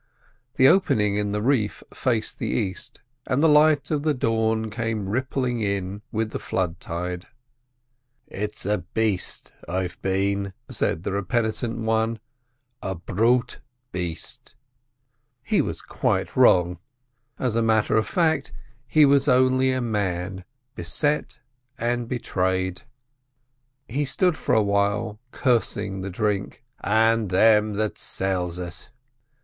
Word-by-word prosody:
The 130 - +6
opening 105 - +3
in 105 -1 -1
the 105 +1 -1
reef 115 -5 +1
faced 115 -4 -1
the - - -2
east, 95 -5 -2 0.3
and 135 +4 +1
the - - +7
light 150 -1 +4
of 150 -2 +1
the 155 -1 +1
dawn 110 -2 0
came 110 -3 -2
rippling 125 +2 -1
in 100 -1 -2
with 110 0 -1
the - - -4
flooding 90 -2 -2
tide. 90 +1 -5 1.0
"It's 105 0 -4
a 105 0 +1
baste 100 +2 -2 0.2
I've 90 -1 -3
been," 100 +1 0 0.2
said 80 - -1
the - - -2
repentant 110 +4 -1
one—"a 115 0 -4
brute 115 +8 +1 0.3
baste." 85 -2 -5 0.9
He - - +2
was - - -4
quite - - -1
wrong; 90 -1 +4 0.6
as 125 -4 -1
a 115 - +3
matter 110 -2 +2
of 110 - +2
fact, 165 -3 +1 0.4
he 150 +5 +6
was 140 0 +4
only 130 0 +4
a 130 0 0
man 95 -4 -2 0.3
beset 150 +2 -1 0.4
and 120 0 -1
betrayed. 95 -6 -1 1.1
He 140 +5 -1
stood 175 +5 +2
for - - 0
a 110 - +4
while, 100 +2 0
cursing 115 -6 0
the 95 - -4
drink, 100 +1 -2 0.2
"and 110 0 +3
them 105 +2 +4
that 110 0 -1
sells 90 -2 -1
it." 90 -1 -7
110 Hz, 125 wpm, -24 LUFS, 95-125 Hz, 1.1 s, the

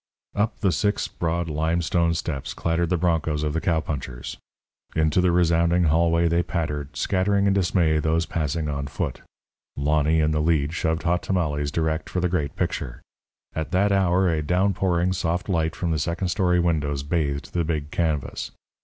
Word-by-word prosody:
Up 105 +1 -1
the 95 -4 +3
six 105 +3 0
broad, 85 0 -2
limestone 85 +2 +1
steps 70 -5 -4
clattered 85 0 0
the 90 - +2
broncos 80 -3 0
of 75 -1 -1
the 80 - -1
cowpunchers. 70 -7 -2 0.6
Into 80 +2 +2
the 90 -1 +3
resounding 85 0 +3
hallway 85 +1 +3
they 85 +1 +2
pattered, 75 -4 -3
scattering 100 +1 +1
in 100 - +3
dismay 85 -5 +2
those 80 +2 +1
passing 80 0 -2
on 70 -1 -3
foot. 70 -1 -4 0.6
Lonny, 75 +2 +2
in 75 0 +2
the 75 0 +1
lead, 75 -2 +1
shoved 80 -1 -1
Hot 85 +1 +1
Tamales 75 -6 -1
direct 80 +1 -1
for 90 - -2
the 90 0 +1
great 75 -6 -1
picture. - - -3 0.5
At 80 -1 -3
that 100 +3 +3
hour 95 -1 +3
a 80 -3 +1
downpouring, 90 +1 +1
soft 85 0 -1
light 80 -4 0
from 85 -2 -2
the 80 - 0
second 85 +5 -1
story 90 -1 +2
windows 75 -5 0
bathed 70 -2 -2
the 85 - +1
big 75 -2 -3
canvas. 80 -5 -1
85 Hz, 170 wpm, -24 LUFS, 75-90 Hz, 0.6 s, the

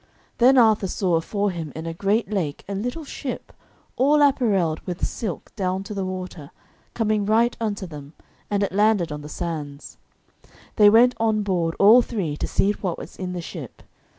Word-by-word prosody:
Then 260 +3 +6
Arthur 220 -5 +4
saw 185 -1 -1
afore 200 +5 0
him 165 -4 -6
in 160 +1 -6
a 165 - -4
great 200 +6 0
lake 170 -9 -2
a 200 - -4
little 245 +11 -4
ship, 275 -2 -6 0.4
all 290 +3 +4
apparelled 200 - +2
with 180 -1 -4
silk 210 -7 -5
down 190 -2 -2
to 205 - -7
the 195 -2 -3
water, 185 -5 -6 0.5
coming 215 -2 +1
right 225 +4 +2
unto 205 -3 -2
them, 150 -3 -10 0.4
and 205 -1 +1
it 200 - -1
landed 205 -4 +2
on 150 0 -5
the 150 - -9
sands. 150 -4 -6 0.8
They 210 -1 +8
went 240 +4 +6
on 220 -2 +1
board, 175 -4 -1
all 220 +5 +7
three, 195 -11 -3
to - - -3
see 200 - +2
what 190 -4 -3
was - - -10
in 180 -1 -5
the 175 - -4
ship. - - -9
195 Hz, 180 wpm, -23 LUFS, 170-220 Hz, 0.8 s, They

